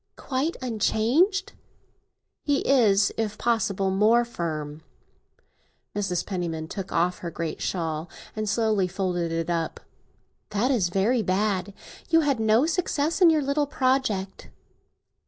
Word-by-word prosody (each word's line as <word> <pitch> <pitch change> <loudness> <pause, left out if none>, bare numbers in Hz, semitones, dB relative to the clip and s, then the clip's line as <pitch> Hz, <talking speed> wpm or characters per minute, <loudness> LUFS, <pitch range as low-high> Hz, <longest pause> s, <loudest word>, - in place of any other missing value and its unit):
"Quite 280 +5 -2
unchanged?" 255 - +1 0.9
"He 285 -2 +1
is, 210 -7 +4
if 215 -2 -2
possible, 210 -5 0
more 220 +5 +4
firm." 155 -8 -5 1.1
Mrs. 195 -4 -1
Penniman 170 -5 -3
took 195 -2 -6
off 175 +2 +1
her 170 - -5
great 165 -1 -5
shawl, 160 -2 -2 0.3
and 215 -1 -2
slowly 215 -3 +1
folded 175 -2 -2
it 165 +1 -2
up. 165 -1 -2 0.7
"That 220 +6 +1
is 205 -9 +1
very 210 +7 +2
bad. 195 0 -1 0.3
You 325 -1 +5
had 280 -5 +1
no 220 +4 +3
success 325 -2 0
with 350 - +8
your 310 -2 +2
little 280 +1 0
project?" 255 -9 -1
210 Hz, 125 wpm, -25 LUFS, 180-255 Hz, 1.1 s, with